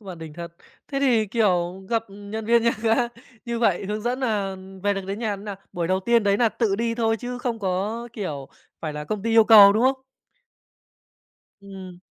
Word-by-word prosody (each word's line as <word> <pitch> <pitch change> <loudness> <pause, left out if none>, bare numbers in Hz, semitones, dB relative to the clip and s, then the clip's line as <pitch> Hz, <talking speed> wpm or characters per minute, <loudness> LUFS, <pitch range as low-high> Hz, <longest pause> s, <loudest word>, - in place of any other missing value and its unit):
bạn 185 -5 -9
đỉnh 160 -2 -9
thật. 170 0 -8 0.3
Thế 275 -1 -2
thì, 240 -6 +3
kiểu, 190 -4 0
gặp 225 -1 +1
nhân 205 +2 -7
viên 235 +1 +3
nhà 235 - +3
ga 225 -1 +3 0.5
như 235 -1 -3
vậy 200 -5 +1
hướng 210 +2 -3
dẫn 245 +3 -2
nà 205 -6 -1 0.3
về 205 0 +1
được 195 - -3
đến 200 +2 -4
nhà 215 -3 -2
thế 195 - -12
nào? 205 -2 -6 0.2
Buổi 170 -1 -2
đầu 185 0 +1
tiên 235 +3 +2
đấy 200 -1 +2
nà 235 +1 +3
tự 215 -3 -1
đi 230 +1 -1
thôi 225 -1 +1
chứ 245 +3 -6
không 245 -2 -3
có, 205 +4 -2
kiểu, 150 -11 -5 0.3
phải 155 -2 -4
là 150 0 -6
công 200 +6 -4
ty 230 - -1
yêu 225 -1 +6
cầu, 205 -3 +9
đúng 215 +3 +1
không? 265 0 +1 1.6
Ừm. 190 -2 -11
210 Hz, 215 wpm, -24 LUFS, 190-230 Hz, 1.6 s, cầu